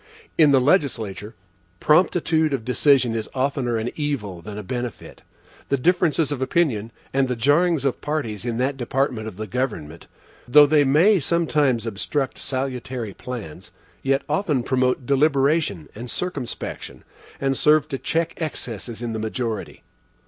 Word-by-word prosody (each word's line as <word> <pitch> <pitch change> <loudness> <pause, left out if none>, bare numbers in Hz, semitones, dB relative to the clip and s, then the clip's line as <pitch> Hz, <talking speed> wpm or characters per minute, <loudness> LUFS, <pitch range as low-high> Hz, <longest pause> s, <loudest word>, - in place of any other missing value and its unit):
In 155 -3 +6
the 135 -2 +5
legislature, 115 - 0 0.4
promptitude 160 -2 +3
of 115 -4 -7
decision 125 -1 +3
is 110 -1 -3
oftener 130 -3 0
an 110 +2 -2
evil 120 - -3
than 105 +3 -8
a 105 - -5
benefit. 120 +3 -6 0.5
The 140 - +2
differences 165 0 +2
of 140 -3 -3
opinion, 130 -7 0 0.2
and 135 0 +2
the 125 - -1
jarrings 145 +5 +2
of 135 - -1
parties 130 -9 -3
in 120 -2 -2
that 135 +2 0
department 125 -3 -1
of 100 -4 -8
the 110 - -4
government, 95 - -4 0.4
though 145 +4 +8
they 145 0 +4
may 165 +9 +4
sometimes 150 -7 +1
obstruct 125 +6 -2
salutary 130 -4 -4
plans, 115 -12 -8 0.3
yet 135 +1 +1
often 150 -5 0
promote 130 0 +1
deliberation 140 - +2
and 120 +3 -8
circumspection, 145 -8 -5 0.4
and 135 0 0
serve 150 +2 +4
to 135 - -3
check 165 +1 -2
excesses 120 -6 -5
in 115 -1 -3
the 110 - -3
majority. 110 0 -4
130 Hz, 145 wpm, -23 LUFS, 115-150 Hz, 0.5 s, though